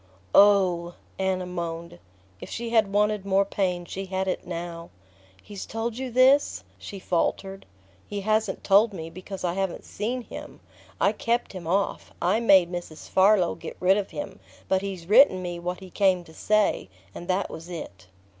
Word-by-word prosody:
"Oh 185 -4 +4
" - - -29
Anna 190 -1 0
moaned. 170 - -5 0.4
If - - -9
she 235 0 -4
had 220 -4 +3
wanted 210 0 +1
more 195 0 +2
pain 180 -3 -1
she 195 +2 -6
had 190 0 -2
it 185 - -3
now. 170 -1 -6 0.5
"He's 205 -2 -8
told 225 +2 -3
you 260 -1 -3
this?" 260 +4 +4 0.2
she 200 - -8
faltered. 195 +2 -2 0.4
"He 205 -1 -4
hasn't 215 0 0
told 205 +2 +4
me, 165 -3 -7
because 185 +2 -8
I 175 -1 0
haven't 190 -1 -3
seen 240 +5 -3
him. - - -10 0.4
I - - +4
kept 235 -1 -1
him 180 -3 -7
off 195 +4 -1
I 185 +6 +2
made 190 -6 +5
Mrs. 175 -3 -7
Farlow 190 -2 +4
get - - -9
rid 185 +1 +4
of 200 -1 -2
him. 290 - -7 0.3
But 190 0 +2
he's 190 -4 -5
written 210 -2 +6
me 175 -1 -4
what 180 +2 -4
he 185 -1 -11
came 190 -3 +2
to 160 - -16
say; 215 - +1 0.2
and 175 - -9
that 190 +2 0
was 165 +2 -9
it." 100 - -8
190 Hz, 175 wpm, -26 LUFS, 175-210 Hz, 0.5 s, written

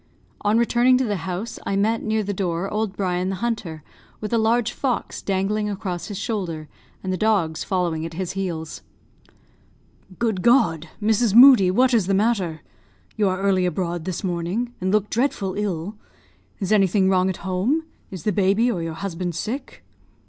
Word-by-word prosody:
On 210 +2 +2
returning 240 +2 +4
to 260 - +1
the 210 -4 -1
house 190 +6 -4
I 200 - -2
met, 220 +3 +1
near 220 0 0
the 205 0 -3
door, 180 -1 -2
old 210 -2 -2
Brian 185 -1 -1
the 195 - -2
hunter, 190 -8 -3 0.4
with 215 +1 -5
a 230 - +3
large 230 +1 +2
fox 255 -1 -2
dangling 205 +2 -1
across 190 -4 -4
his 205 - -6
shoulder, 185 -8 -3 0.4
and 185 -1 -2
the - - -1
dogs 195 -8 +1
following 175 -5 -1
at 165 0 -6
his 185 0 -3
heels. 170 -5 -4 1.4
"Good 220 -6 0
God! 180 - +3
Mrs. 220 0 +2
Moodie, 245 -7 +9
what 250 +7 +3
is 215 -6 +3
the 195 - +2
matter? 195 -7 0 0.5
You 210 -3 +2
are 185 +1 -2
early 190 -2 +2
abroad 175 -2 -3
this 185 0 -4
morning, 185 +7 -2
and 185 +1 0
look 210 0 +2
dreadful 220 -6 0
ill. 200 0 -3 0.6
Is 195 -2 -3
anything 195 -2 +3
wrong 185 0 +3
at 185 - -3
home? 200 - 0 0.3
Is 185 -5 -8
the 210 - +1
baby 200 +5 +2
or 175 - -3
your 165 -1 -4
husband 175 -2 -4
sick?" 260 - -5
195 Hz, 175 wpm, -23 LUFS, 180-220 Hz, 1.4 s, Moodie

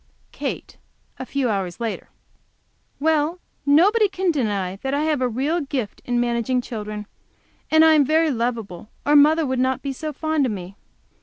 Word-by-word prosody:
Kate, - - -5 0.4
a 260 - -6
few 275 -2 -1
hours 195 -4 -2
later. 230 -2 -4 0.9
Well, 315 +3 +1 0.3
nobody 400 +9 +5
can 375 -1 0
deny 200 - -1
that 270 +6 -2
I 290 - 0
have 305 -3 0
a 255 - +2
real 285 +9 -1
gift 265 -7 -4
in 245 -1 0
managing 240 +1 0
children! 210 -3 -6 0.6
And 315 0 +6
I 320 - +6
am 300 -2 +5
very 315 +3 +2
lovable, 225 -6 -3 0.2
or 295 - +4
mother 310 +2 +5
wouldn't 260 0 0
be 275 -1 -3
so 310 +3 -5
fond 315 -1 0
of - - -2
me. 190 -1 -7
265 Hz, 165 wpm, -22 LUFS, 230-310 Hz, 0.9 s, And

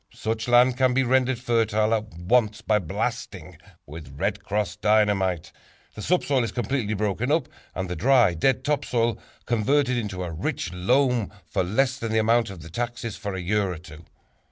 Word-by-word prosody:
Such 110 +1 -3
land 125 +1 +5
can 130 -1 +2
be 135 - +3
rendered 130 0 +2
fertile 115 -3 +1
at 110 -1 0
once 110 +4 +1
by 110 -1 +2
blasting 85 - -4 0.3
with 75 -2 -10
"Red - - -2
Cross" 105 0 -2
Dynamite. 100 -5 +1 0.4
The 105 - -8
subsoil 140 -4 +1
is 115 - -3
completely 120 -3 -1
broken 105 +5 -1
up 160 0 +1 0.3
and 95 0 -3
the 90 - -4
dry, 120 0 +4
dead 130 +10 +1
top 145 0 0
soil 115 -2 0 0.3
converted 125 +3 +1
into 100 -5 -3
a 85 - -5
rich 80 +2 -3
loam 125 +5 +1
for 90 - -1
less 130 +8 0
than 115 -2 -3
the 110 - +1
amount 115 +1 +3
of 90 -5 -9
the 85 - -10
taxes 115 0 -4
for 100 -3 -5
a 95 - -4
year 100 +1 0
or 90 - -5
two. 80 -1 -13
110 Hz, 180 wpm, -25 LUFS, 95-125 Hz, 0.4 s, land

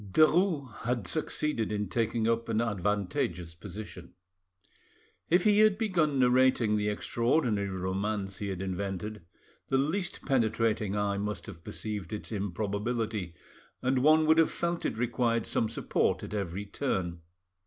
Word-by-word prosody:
Derues 155 - +3
had 120 -3 -2
succeeded 115 - -1
in 105 -1 -1
taking 115 +2 0
up 115 0 0
an 110 -1 +1
advantageous 100 -5 -1
position. 95 0 -9 1.1
If 175 +2 +4
he 210 -1 +5
had 215 -2 +5
begun 170 -10 +1
narrating 125 -3 +4
the 105 0 0
extraordinary 115 -1 0
romance 95 +2 -2
he 105 - -3
had 95 -1 -3
invented, 100 +3 -4 0.5
the 135 - +3
least 160 +7 -1
penetrating 110 -5 +1
eye 100 -1 0
must 105 +1 -3
have 85 -5 -10
perceived 105 -4 -5
its 105 - -6
improbability, 105 -1 -2 0.5
and 130 0 +2
one 155 +3 +5
would 160 +1 +5
have 165 - +5
felt 170 0 -1
it 110 - -4
required 115 -1 +1
some 110 - 0
support 115 - 0
at - - -7
every 100 -1 -3
turn. 95 -8 -2
110 Hz, 140 wpm, -30 LUFS, 100-130 Hz, 1.1 s, he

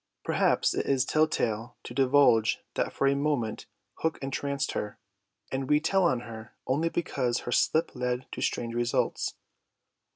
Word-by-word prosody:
Perhaps - - +2
it - - -2
is 135 -2 +2
tell 155 +2 +3
tale 115 -4 -2
to - - -8
divulge 130 -4 +4 0.2
that - - -1
for - - -1
a 135 - +4
moment 140 -6 -1 0.3
Hook 160 -1 0
entranced 140 0 -2
her, 105 - -4 0.5
and 130 0 -3
we 150 0 +5
tell 185 +4 +2
on 130 -8 +2
her 110 -2 -10
only 155 +6 +1
because 130 -8 -1
her 120 - -5
slip 160 +6 +2
led 125 +1 -2
to - - -6
strange 115 -1 -1
results. 120 0 0
130 Hz, 160 wpm, -28 LUFS, 120-145 Hz, 0.5 s, we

